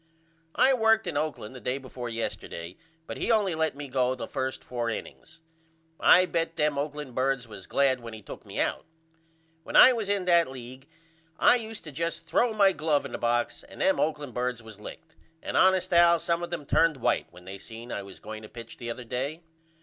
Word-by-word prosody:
I 270 - +5
worked 225 -2 +3
in - - -4
Oakland 145 -6 -3
the 130 - -9
day 125 +5 -1
before 130 -2 -7
yesterday 90 -6 -5 0.3
but - - -6
he - - 0
only 210 -5 +2
let 160 -1 0
me 145 0 -7
go 130 -1 +1
the - - -5
1st 130 0 -3
4 120 -2 -3
innings. 160 +8 -8 0.6
I 185 - +7
bet 165 -1 -2
them 150 -2 +1
Oakland 150 -2 -4
birds 130 -1 0
was 105 -4 -11
glad 135 -2 +2
when 115 -2 -8
he 110 - -12
took - - -9
me - - -6
out. - - -1 0.8
When - - -8
I 255 - +9
was 220 -4 -3
in 200 -2 0
that 170 -4 +4
league 130 +1 -10 0.5
I 250 - +6
use 225 -2 -6
to 155 - -9
just 165 +3 -2
throw 235 +7 +2
my 200 -3 +4
glove 150 -3 0
in 140 - -7
the - - -5
box 120 0 0
and - - -14
them 285 +1 +2
Oakland 150 -4 -1
birds 125 -1 -2
was 110 -2 -12
licked 160 +8 -11 0.3
and - - -4
honest 185 0 +4
Al 170 0 +6
some 170 +1 -1
of 175 - -4
them 165 -4 -5
turned 165 +1 +3
white 120 - 0
when 90 - -16
they 95 +1 -8
seen 115 +4 -10
I - - -3
was 100 -1 -11
going 110 +1 -8
to 110 - -11
pitch 115 -1 -10
the 120 -2 -6
other 120 +2 -5
day. 135 +8 -4
140 Hz, 215 wpm, -27 LUFS, 120-170 Hz, 0.8 s, I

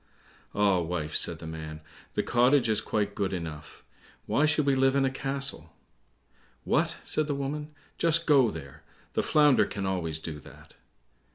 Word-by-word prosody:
"Ah, 100 -3 +3
wife," 80 -2 -3
said 85 - +2
the 80 - -10
man, 80 -1 -7 0.4
"the - - +1
cottage 125 +1 +3
is 110 -1 +2
quite 105 -2 -1
good 100 -2 -2
enough; 80 -4 -7 0.4
why 145 - +2
should 150 -1 +2
we 140 - +3
live 135 0 +3
in 135 -1 +3
a 130 - 0
castle?" 135 - -2 0.9
"What!" - - +1
said 155 -1 -1
the 145 - -1
woman; 145 +2 -4 0.3
"just 165 0 +3
go 135 -6 +5
there, 70 -8 -9 0.3
the - - +1
Flounder 150 -3 +4
can 100 -1 -4
always 85 -5 -2
do 80 -1 -6
that." - - -15
110 Hz, 165 wpm, -28 LUFS, -, 0.9 s, go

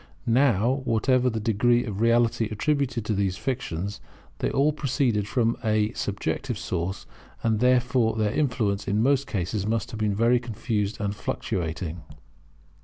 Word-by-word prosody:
Now, 125 +1 +3
whatever 125 +3 +2
the 115 -2 -2
degree 120 +2 +2
of 105 -2 -4
reality 115 -1 +3
attributed 120 0 -1
to 110 - 0
these 95 -2 0
fictions, 100 - -3 0.4
they - - 0
all 145 +2 +2
proceeded 125 -8 0
from 115 -1 +1
a 110 -1 +1
subjective - - -3
source; 90 +3 -3 0.4
and 110 -2 +1
therefore 125 -2 +3
their 105 -2 0
influence 115 -8 0
in 105 +3 +1
most 140 +1 +2
cases 100 +1 -2
must 115 0 -1
have 110 - -6
been 105 -2 0
very 120 +3 +3
confused 110 -3 -3
and 100 -1 -2
fluctuating. 85 -5 -3
115 Hz, 145 wpm, -26 LUFS, 105-125 Hz, 0.4 s, Now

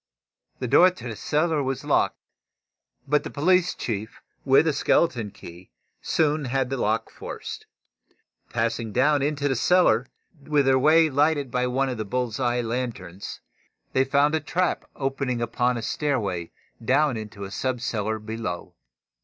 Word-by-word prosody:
The 125 - -3
door 180 +9 +7
to 180 -9 -8
the 115 - -5
cellar 155 +5 0
was 135 -1 -3
locked, - - +2 0.9
but 150 +1 +2
the - - -5
police 180 +4 +2
chief, 110 -2 -4 0.2
with 135 +3 +5
a 160 - +2
skeleton 125 -8 +1
key, 90 -3 -13 0.3
soon 150 -2 +1
had 130 0 -1
the 135 - -1
lock 110 -1 0
forced. - - -8 0.8
Passing 115 -1 -2
down 145 +3 +3
into 145 0 0
the 135 - +1
cellar, 130 -5 +3 0.3
their 140 -2 +3
way 155 +3 +5
lighted 145 -1 +2
by 125 0 0
one 135 +2 0
of 125 -3 -4
the - - -1
bull's 120 +2 -2
eye 120 -1 +1
lanterns, 115 -6 -5 0.5
they 130 - +4
found 140 +2 +2
a 160 - +2
trap 175 +5 -1
opening 135 -2 -2
upon 120 +1 0
a 115 - -5
stairway 105 - -1 0.3
down 135 +3 +2
into 110 -2 -7
the 95 - -7
sub 130 +4 -2
cellar 110 -2 -2
below. 110 -4 -5
130 Hz, 155 wpm, -25 LUFS, 115-145 Hz, 0.9 s, door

